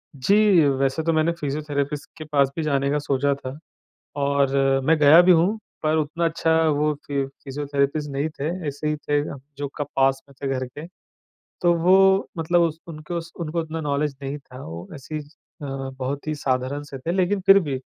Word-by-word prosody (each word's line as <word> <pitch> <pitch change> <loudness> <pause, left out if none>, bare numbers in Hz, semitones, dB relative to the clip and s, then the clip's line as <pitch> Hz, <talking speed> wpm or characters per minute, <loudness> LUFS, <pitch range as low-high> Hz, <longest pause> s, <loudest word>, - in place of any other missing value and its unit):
जी, 140 +9 +2 0.3
वैसे 135 +3 0
तो 165 +1 +1
मैंने 160 +1 +2
फिज़ियोथेरेपिस्ट 145 -1 -3
के 155 - -6
पास 140 -2 +3
भी 165 - -2
जाने 140 -2 +1
का 145 - +1
सोचा 140 0 +1
था, 135 0 -8 0.6
और 140 -1 +2 0.3
मैं 160 +3 +4
गया 150 +3 +8
भी 180 +1 +6
हूँ। 180 +6 +3 0.2
पर 155 0 +2
उतना 155 +2 -1
अच्छा 165 0 +1 0.2
वो 150 0 +2
फि 140 -1 -1 0.2
फिज़ियोथेरेपिस्ट 145 +1 -1
नहीं 140 +3 -1
थे, 150 -1 -4 0.2
ऐसे 145 +2 -3
ही 150 - 0
थे, 145 -1 0 0.3
जो 145 0 -3
का 145 - -2
पास 135 0 +3
में 140 - -17
थे 140 - -1
घर 130 0 -2
के। 145 +6 -9 0.7
तो 175 -1 +4
वो 190 +2 +5
मतलब 175 +2 +2
उस 165 -2 0
उनको 165 +2 -5
स 165 0 -12
उनको 165 0 -2
उतना 160 0 -5
नॉलेज 145 -1 -1
नहीं 140 +2 -4
था, 130 -2 -12
वो 85 +2 -8
ऐसे 140 +2 -9
ही 155 - -1
ज 145 -1 -13 0.3
अ, - - -4 0.3
बहुत 135 +3 -4
ही 155 - -1
साधारण 135 0 -1
से 140 -2 -9
थे। 165 +6 -3
लेकिन 190 +2 +1
फिर 195 0 +9
भी 145 -7 -3
145 Hz, 200 wpm, -23 LUFS, 140-160 Hz, 0.7 s, फिर